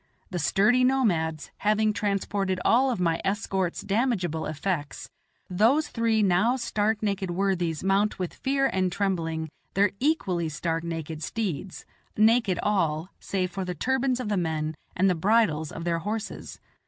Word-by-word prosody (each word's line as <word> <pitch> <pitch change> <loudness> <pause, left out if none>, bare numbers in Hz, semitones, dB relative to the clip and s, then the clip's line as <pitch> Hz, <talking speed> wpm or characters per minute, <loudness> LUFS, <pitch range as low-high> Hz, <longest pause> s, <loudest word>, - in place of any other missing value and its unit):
The 180 - -2
sturdy 210 +10 +3
nomads, 175 - +1
having 215 +1 +2
transported 200 -2 -1
all 260 +3 +4
of 240 - -1
my 165 -2 +1
escort's 190 -2 -1
damageable 195 - 0
effects, 155 -2 -3 0.4
those 230 +12 +2
three 225 -2 +1
now 200 +6 +3
stark 220 -3 -1
naked 200 -2 -1
worthies 175 -3 -1
mount 195 +2 +2
with 180 -2 -3
fear 275 0 0
and 185 -7 +1
trembling 165 -5 -1 0.3
their 200 0 +4
equally 190 - 0
stark 165 +2 -2
naked 160 -2 -5
steeds 190 -3 -4 0.3
naked 220 -3 +4
all, 170 -5 0
save 185 -2 -2
for 190 +2 -3
the 180 -1 -4
turbans 265 +1 0
of 250 - -3
the 205 -1 0
men 160 -3 -1 0.2
and 190 +2 +3
the 185 - +4
bridles 175 -4 +2
of 165 - -6
their 170 -1 0
horses. 215 +5 -5
195 Hz, 150 wpm, -26 LUFS, 170-220 Hz, 0.4 s, all